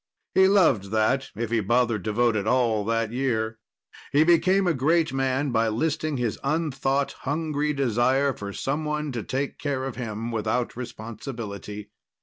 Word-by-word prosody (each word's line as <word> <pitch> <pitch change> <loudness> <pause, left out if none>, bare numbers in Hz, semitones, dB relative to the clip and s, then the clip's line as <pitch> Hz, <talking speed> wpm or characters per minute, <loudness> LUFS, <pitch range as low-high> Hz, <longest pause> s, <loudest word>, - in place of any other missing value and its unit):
He 190 0 +6
loved 175 - +4
that, 110 +6 +1
if 115 +1 -3
he 115 - +2
bothered 115 0 +1
to 110 - 0
vote 120 +1 +2
at 105 0 -1
all 115 -4 +2
that 115 0 0
year. 110 -3 -1 0.5
He 145 +2 +5
became 180 +4 +4
a 175 - +3
great 160 +3 +2
man 135 +1 0
by 115 -1 +2
listing 155 +6 -1
his 120 -4 -2
unthought, 140 -2 0
hungry 150 0 -1
desire 135 +1 +2
for 100 -3 -6
someone 150 +5 -2
to 120 -3 -3
take 135 +5 -3
care 140 -3 -2
of 135 -3 -5
him 115 -1 -4
without 115 +2 -1
responsibility. 110 -3 -7
130 Hz, 155 wpm, -25 LUFS, 110-145 Hz, 0.5 s, He